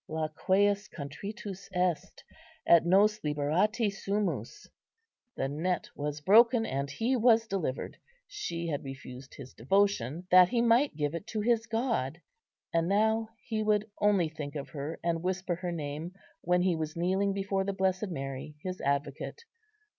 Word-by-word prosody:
"Laqueus 190 +6 +1
contritus 195 +7 -7
est, 180 -2 -1 0.4
et 170 -1 +6
nos 205 +5 +4
liberati 185 +9 +1
sumus:" 200 - -3 0.7
the 135 - 0
net 165 +5 -2
was 145 0 -4
broken 225 - +5
and 140 -3 -2
he 230 - 0
was 230 -1 +4
delivered. 180 -11 -3 0.3
She 290 - -5
had 150 -4 -2
refused 135 -1 -9
his 130 -2 -10
devotion, 175 - +1
that 180 0 +8
he 240 - +1
might 235 - +3
give 145 0 -1
it 170 +5 -6
to 220 -1 -2
his 230 +1 +1
God; 225 - -1 0.5
and 165 0 +2
now 220 +3 +2 0.2
he 220 -2 -2
would 210 0 +1
only 200 -5 +3
think 150 -2 -7
of 140 -2 -5
her, 145 +1 -5
and 165 -1 0
whisper 185 0 -1
her 180 0 -3
name, 160 +2 -5 0.3
when 180 +1 +2
he 180 -2 +2
was 155 -1 -4
kneeling 190 +3 +1
before 195 0 -1
the 200 - -1
Blessed 190 +1 0
Mary, 135 -2 -5
his 185 0 -4
advocate. 140 - -2
185 Hz, 150 wpm, -30 LUFS, 150-210 Hz, 0.7 s, that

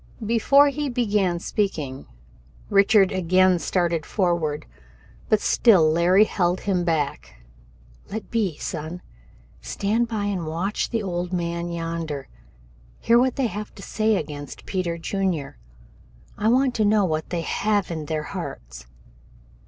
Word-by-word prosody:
Before 275 +6 +5
he 290 0 -3
began 210 -7 +1
speaking, 155 -8 -3 0.6
Richard 200 -1 +5
again 185 0 +3
started 170 -1 0
forward, 170 -5 -1 0.6
but 215 - +4
still 185 -9 +4
Larry 175 +5 +5
held 180 -4 0
him 185 -3 0
back. 160 -4 -2 0.7
"Let 220 +1 -6
be, 200 -9 0
son. 165 +2 -5 0.6
Stand 220 +4 -1
by 215 -3 -2
and 190 -5 -2
watch 175 +6 -2
the 225 -3 -2
old 175 -2 -3
man 170 -1 -2
yonder. 165 -4 -4 0.7
Hear 235 +1 +4
what 255 0 +2
they 270 - 0
have 210 -2 -5
to 195 - -11
say 220 0 +1
against 145 -4 -6
Peter 180 -3 -2
Junior. 170 - -2 0.8
I 210 - -1
want 255 +2 +3
to 215 - +2
know 205 -1 +3
what 155 -2 -2
they 175 -2 -2
have 205 +2 0
in 160 -2 -4
their 155 -1 -2
hearts." - - -7
185 Hz, 135 wpm, -23 LUFS, 165-210 Hz, 0.8 s, Before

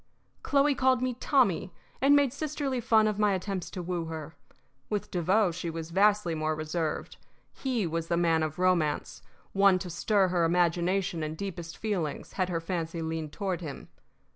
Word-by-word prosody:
Chloe 285 +1 +3
called 260 -1 +2
me 255 -1 0
"Tommy," 235 - +2 0.3
and 280 +2 +6
made 280 -3 +3
sisterly 280 -3 -2
fun 220 -2 +4
of 210 -1 -1
my 210 -1 +3
attempts 190 -1 -3
to 180 - -6
woo 175 -1 -2
her. 160 -1 -6 0.6
With 205 -1 -3
Devoe 185 +3 +2
she 170 0 -4
was 165 0 -6
vastly 200 -1 +3
more 155 0 -1
reserved. 155 0 -3 0.4
He 250 -7 -1
was 165 0 -2
the 170 - +1
man 165 -2 +3
of 155 -1 -2
romance, 180 -5 +1 0.3
one 195 -1 +5
to 180 -1 -6
stir 195 +2 +2
her 175 -1 +1
imagination 175 +1 +1
and 155 +1 -4
deepest 170 -3 -6
feelings 185 -9 -3
had 185 -2 -1
her 170 -2 -1
fancy 165 -1 -3
leaned 160 -1 -3
toward 190 -2 -3
him. 150 -5 -7
180 Hz, 170 wpm, -29 LUFS, 165-210 Hz, 0.6 s, and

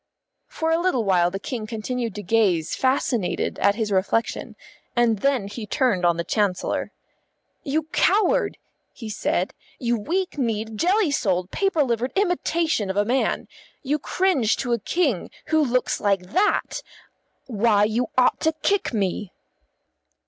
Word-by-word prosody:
For 320 0 -2
a 325 - +3
little 345 -10 +1
while 180 -3 +3
the 190 - -4
King 220 +1 -5
continued 230 +1 -3
to 210 - -5
gaze 185 -5 +2
fascinated 255 -6 0
at 200 0 +3
his 220 -2 -2
reflection, 200 +4 0 0.4
and 235 -3 +3
then 265 -5 +1
he 210 +1 -7
turned 220 -7 +1
on 170 -1 +2
the 170 - -1
Chancellor. 200 -1 -1 0.7
"You 310 +2 -1
coward!" 400 0 +2 0.4
he 225 - -8
said. 210 - -1 0.2
"You 240 -2 0
weak 345 - -2
kneed, 220 -3 -2
jelly 370 -1 +3
souled, 185 -8 0
paper 390 -6 +1
livered 240 0 -1
imitation 340 - 0
of 190 - -2
a 205 - +3
man! 255 +4 0 0.4
You 295 +2 0
cringe 295 - +1
to 245 -3 -1
a 235 - +1
King 275 - 0 0.2
who 315 -1 +3
looks 255 -2 0
like 195 -2 0
that! 410 - +1 0.6
Why, 215 -3 +2
you 225 +3 +1
ought 255 - +4
to 320 0 +1
kick 395 -11 +1
me." 195 -1 -1
235 Hz, 150 wpm, -23 LUFS, 205-295 Hz, 0.7 s, ought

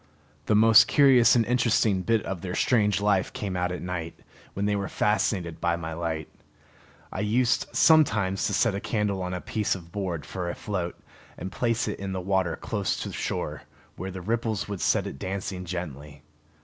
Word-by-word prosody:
The 105 - +3
most 110 +1 +7
curious 135 -5 +6
and 115 -2 +3
interesting 115 -5 +2
bit 115 +3 +1
of 95 -3 -4
their 90 0 -4
strange 105 -5 +2
life 100 -2 +2
came 100 -3 -4
out 90 0 -1
at 90 - -5
night, 85 -2 -5 0.4
when 100 - -1
they 105 0 +1
were 100 -1 -2
fascinated 95 -5 0
by 85 -1 +1
my 80 -1 -5
light. 80 -2 -3 0.9
I - - -4
used 115 +3 +1
sometimes 110 - +3
to 105 - -2
set 115 -4 +2
a 100 - -2
candle 105 -3 -1
on 90 0 -3
a - - -3
piece 105 -2 -1
of 85 -3 -11
board 90 -7 -3
for 90 -2 -4
a - - -4
float, 90 -5 -4 0.4
and 95 +3 -6
place 115 +2 0
it - - -4
in 95 0 -4
the 95 - -2
water 95 -2 0
close - - -2
to - - -6
shore, - - -4 0.3
where 95 +2 -5
the 95 0 -7
ripples 110 0 -1
would 100 -3 -5
set - - +2
it 70 - -7
dancing 95 -1 -4
gently. 75 -5 -7
95 Hz, 190 wpm, -26 LUFS, 90-110 Hz, 0.9 s, most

